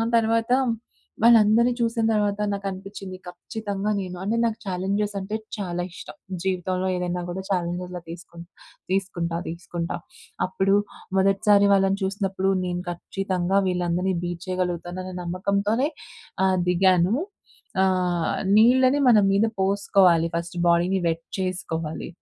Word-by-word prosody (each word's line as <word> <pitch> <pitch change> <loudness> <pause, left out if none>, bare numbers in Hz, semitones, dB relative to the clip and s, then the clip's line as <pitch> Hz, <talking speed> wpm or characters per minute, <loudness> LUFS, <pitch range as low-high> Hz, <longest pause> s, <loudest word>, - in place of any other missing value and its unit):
తర్వాత, 230 +1 +2 0.7
వాళ్ళందరిని 230 +1 +6
చూసిన 230 -1 0
తర్వాత 205 -1 +1
నాకు 200 0 -4
అనిపించింది 195 0 -8
ఖచ్చితంగా 200 +3 -4
నేను 180 -1 -6
అంటే, 210 +4 0
నాకు 225 -1 -1
ఛాలెంజెస్ 200 +3 -1
అంటే 195 +3 -4 0.2
చాలా 175 -3 -3
ఇష్టం. - - -10 0.3
జీవితంలో 185 0 -1
ఏదైనా 180 0 -2
కూడా 185 +2 -4
ఛాలెంజెస్‌లా 180 0 -2
తీసుకు 170 0 -10 0.5
తీసుకుంటా 175 -3 -1
తీసుకుంటా. 170 0 -4 0.5
అప్పుడు 190 +1 +1 0.4
మొదటిసారి 200 +1 +4
వాళ్ళని 195 0 +2
చూసినప్పుడు, 195 -1 0
నేను 175 0 -2
ఖచ్చితంగా 190 +1 -1
వీళ్ళందరినీ 180 +1 0
బీట్ 175 0 -4
చేయగలుగుతాను 180 -1 -2
అనే 185 - -7
నమ్మకంతోనే 200 - 0 0.6
ఆహ్, 190 -1 +3
దిగాను. 185 +2 +3 0.7
ఆహ్, 180 -3 +1 0.2
నీళ్ళని 255 +5 +5
మన 230 - +7
మీద 200 +3 +3
పోసుకోవాలి 190 -3 +3
ఫస్ట్ 170 +1 -4
బాడీని 175 +3 +3
వెట్ 165 0 -2
చేసుకోవాలి. 165 -4 -3
190 Hz, 115 wpm, -24 LUFS, 175-200 Hz, 0.7 s, మన